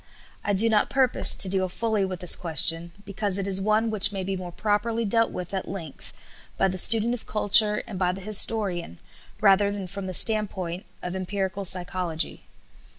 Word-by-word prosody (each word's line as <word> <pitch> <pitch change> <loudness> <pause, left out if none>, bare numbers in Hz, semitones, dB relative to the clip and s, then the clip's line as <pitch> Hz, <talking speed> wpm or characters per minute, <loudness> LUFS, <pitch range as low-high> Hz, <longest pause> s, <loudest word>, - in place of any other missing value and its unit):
I 205 - -2
do 210 +4 +2
not 215 -2 0
purpose 260 -2 +3
to 195 - +6
deal 185 0 -2
fully 220 +1 -3
with 185 -2 -8
this 180 - +5
question, 165 0 +2
because 200 -1 -3
it 195 0 -3
is 195 -1 +2
one 215 +2 -1
which 205 -2 +2
may 195 -2 -6
be 195 +1 -5
more 180 -1 -9
properly 220 +4 -3
dealt 230 +2 0
with 180 +1 -9
at 190 - -5
length 170 -7 -9 0.5
by 195 - 0
the 185 - -5
student 225 +4 +4
of 245 - -9
culture 210 0 +5
and 205 -6 -9
by 180 -1 -1
the 190 +1 -10
historian, 195 - +1 0.4
rather 200 0 +2
than 200 -2 -7
from 195 +1 -9
the 185 - -4
standpoint 190 -5 0 0.2
of 180 +1 -6
empirical 195 +1 -5
psychology. 180 -3 -2
195 Hz, 185 wpm, -23 LUFS, 185-215 Hz, 0.5 s, to